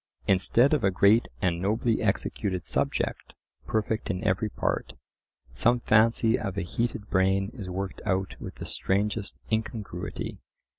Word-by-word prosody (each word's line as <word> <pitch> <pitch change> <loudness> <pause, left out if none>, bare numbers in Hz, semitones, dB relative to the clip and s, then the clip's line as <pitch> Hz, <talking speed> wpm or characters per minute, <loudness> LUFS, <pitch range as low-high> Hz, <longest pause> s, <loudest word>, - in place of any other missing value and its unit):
Instead 115 +8 +4
of 145 -6 +2
a 95 - +5
great 100 +5 +4 0.2
and 85 -2 +1
nobly 110 +3 +1
executed 95 -3 -1
subject, - - -1 0.3
perfect 110 0 -1
in 90 -2 -2
every 105 +4 +1
part, - - -2 0.6
some 120 - +3
fancy 115 +1 +3
of 100 0 -4
a 100 - 0
heated 115 +3 -2
brain 95 +2 +2
is 105 -7 -7
worked 95 +1 -4
out 95 -2 0
with - - -7
the - - -7
strangest 100 +1 -1
incongruity. 110 -5 -3
100 Hz, 140 wpm, -27 LUFS, 95-110 Hz, 0.6 s, a